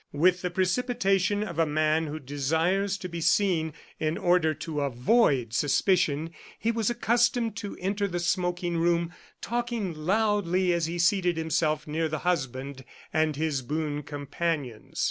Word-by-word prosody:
With 180 +5 +3
the 180 - -1
precipitation 195 +1 +1
of 170 -6 -5
a 165 - +4
man 155 +1 +1
who 150 +1 -5
desires 160 +8 0
to 185 - -6
be 170 -1 -6
seen 170 -2 +2 0.3
in 155 +1 -1
order 175 -3 +2
to 150 0 -4
avoid 135 - +2
suspicion, 155 - +2 0.3
he 230 - 0
was 225 -2 0
accustomed 240 -1 +1
to 205 -3 -6
enter 200 +2 -1
the 175 -2 -3
smoking 175 0 -1
room 170 0 +1 0.3
talking 235 -5 -2
loudly 185 +1 +1
as 170 -2 0
he 170 +1 -3
seated 175 0 +2
himself 155 -1 0
near 160 +2 -1
the 155 0 -3
husband 135 -5 -2 0.3
and 155 -1 +2
his 150 -2 -1
boon 150 +2 -2
companions. 145 -4 -4
170 Hz, 145 wpm, -27 LUFS, 155-195 Hz, 0.3 s, a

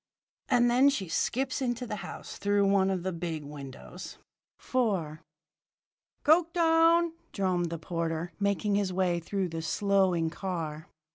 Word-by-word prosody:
_' - - -64 0.5
"And 240 0 +4
then 255 +4 +5
she 235 -10 -2
skips 260 - -1
into 245 -1 -1
the 210 -3 -4
house - - -8
through 205 0 +2
one 195 -1 +3
of 185 -2 -1
the 190 - -1
big 165 -3 -4
windows." 140 - -9 0.4
IV 190 -12 -1 1.0
"Coketown!" 330 +1 +4 0.2
droned 180 -3 0
the 165 - -4
porter, 165 +1 -3
making 200 0 +1
his 200 -2 +1
way 180 -2 +1
through 190 +2 -2
the 165 0 -4
slowing 185 -2 +1
car. 165 -4 -4
190 Hz, 140 wpm, -29 LUFS, 165-240 Hz, 1.0 s, then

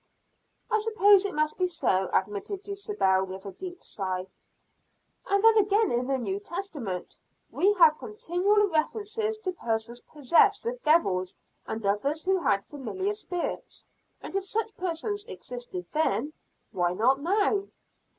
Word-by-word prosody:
"I 435 - +3
suppose 410 -2 +5
it 400 - -3
must 305 +3 0
be 365 - +3
so," 190 - 0
admitted 210 - -2
Dulcibel, 400 - 0
with 190 +1 -7
a 200 - -5
deep 360 - -9
sigh. 185 -2 -3 1.0
"And 400 +1 +2
then 450 0 +7
again 415 +2 +2
in 245 +1 0
the 270 -1 +1
New 385 +11 -3
Testament 335 - -5 0.4
we 395 +3 +3
have 325 -5 +6
continual 420 -1 +1
references 425 +6 -1
to 395 -4 -3
persons 235 -6 -3
possessed 340 - +2
with - - -4
devils, 195 - +2 0.3
and 220 -1 -4
others 275 - 0
who 380 0 +2
had 200 - +1
familiar 340 - -3
spirits, 360 -4 -5 0.4
and - - -8
if 390 -1 0
such 440 +2 -2
persons 375 +4 -3
existed 245 - -7
then, 310 -1 0 0.4
why 175 -3 0
not 255 +8 +2
now?" 400 +3 +1
345 Hz, 140 wpm, -27 LUFS, -, 1.0 s, then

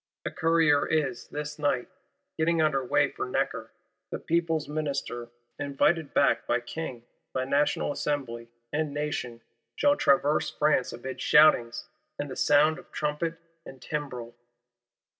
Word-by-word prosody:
A - - -2
courier 160 -3 +3
is, 140 -6 -1
this 150 +1 -6
night, 145 -4 0 0.5
getting 165 +1 +1
under 150 -4 +2
way 125 - +2
for - - -4
Necker: - - -2 0.4
the - - -3
People's 165 -2 0
Minister, 140 -5 -3 0.3
invited 145 +3 +1
back 140 - +2
by 120 - +2
King, 120 -1 -6 0.3
by 130 0 -1
National 145 +2 +1
Assembly, 125 -6 -3 0.2
and 150 -1 -1
Nation, 135 -6 -3 0.3
shall 290 0 +4
traverse 145 - +2
France 150 -4 +1
amid 130 +2 -7
shoutings, 150 -6 +4 0.3
and 145 -1 -4
the - - -5
sound 150 +2 +4
of - - -17
trumpet 150 +2 -2 0.3
and 135 - -11
timbrel. 125 -5 -5
145 Hz, 135 wpm, -28 LUFS, 130-155 Hz, 0.5 s, shall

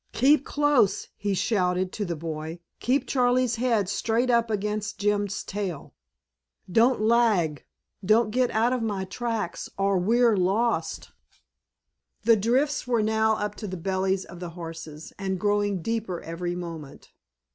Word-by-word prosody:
"Keep 280 +3 +4
close!" 290 -9 +2
he 205 -1 -2
shouted 185 -2 0
to 210 - -3
the 170 -2 -3
boy, 160 +1 -5 0.2
"keep 260 +2 +1
Charley's 250 -2 +2
head 230 -5 +1 0.2
right 235 +3 +2
up 235 -1 +2
against 210 0 -2
Jim's 205 -1 0
tail! 190 -7 -5 0.8
Don't 235 +5 +4
lag, 215 -9 +2 0.4
don't 215 +3 +3
get 250 +2 +2
out 230 +3 +2
of 250 - -1
my 205 -4 -2
tracks 220 -2 -3
or 195 -1 +2
we're 230 +4 +3
lost!" 190 -2 0 1.1
The 230 +1 +6
drifts 250 +8 +1
were 235 -3 +2
now 220 0 +2
up 210 -1 -3
to 210 - -5
the 185 -1 -5
bellies 190 +1 -1
of 175 0 -11
the 175 -1 -5
horses, 165 -2 -8
and 190 -1 -2
growing 205 -2 0
deeper 225 -6 -2
every 175 +1 -4
moment. 165 -5 -8
205 Hz, 145 wpm, -26 LUFS, 180-235 Hz, 1.1 s, The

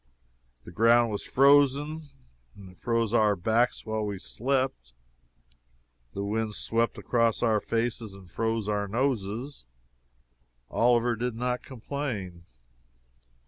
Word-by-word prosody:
The 85 - -11
ground 115 +4 +4
was 105 - -3
frozen, 145 +3 +3 0.5
and 95 -2 -12
it 90 - -22
froze 115 -2 0
our 105 -3 +4
backs 110 +7 +1
while 110 -1 -2
we 100 -2 -3
slept; 125 - -2 1.2
the 100 - -4
wind 105 +1 -2
swept 115 +1 0
across 115 -2 +1
our 110 -2 +3
faces 115 -3 -2
and 95 -2 -14
froze 115 +3 -2
our 105 -1 -1
noses. 120 +2 -2 1.1
Oliver 120 0 +3
did 120 +1 -3
not 125 +1 -2
complain. 115 -9 -6
115 Hz, 115 wpm, -27 LUFS, 105-125 Hz, 1.2 s, ground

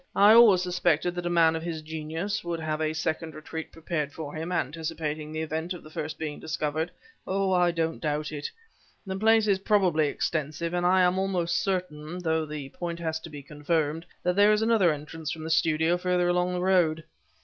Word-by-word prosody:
"I 205 +2 +7
always 215 -6 +7
suspected 175 -1 +1
that 175 0 -3
a - - 0
man 165 -2 +4
of 160 - -3
his 165 -2 -5
genius 160 +7 -4
would 170 -1 -3
have 155 -1 -2
a 155 0 +1
second 160 0 -3
retreat 160 +1 -7
prepared 155 -2 -3
for 145 -1 -7
him, 160 +3 -4
anticipating 155 -1 -3
the 155 0 -3
event 160 +3 -3
of 180 - -10
the 155 - -13
first 155 +1 -5
being 155 -2 -5
discovered. 155 +1 -2 0.4
Oh! 195 0 0
I 180 -1 +4
don't 165 -1 -2
doubt 150 0 -2
it! 145 -1 -4 0.6
The 190 -1 -4
place 215 -1 +3
probably 185 -7 +2
is - - -3
extensive, 155 +2 -2
and 175 0 +1
I 185 +1 +4
am 180 +1 +2
almost 180 -3 0
certain 180 -4 -3
though 160 -3 0
the 150 -2 -6
point 170 +3 -5
has 160 -1 -2
to 165 - -10
be 145 -2 -9
confirmed 150 +2 -2 0.2
that 180 0 +1
there 205 +1 +6
is 215 +1 +2
another 220 -7 +4
entrance 155 +1 -6
from 160 +1 -5
the 160 - -4
studio 160 +1 +2
further 180 -1 +1
along 180 0 +1
the 180 - -2
road. 175 -4 +2
165 Hz, 205 wpm, -27 LUFS, 155-180 Hz, 0.6 s, I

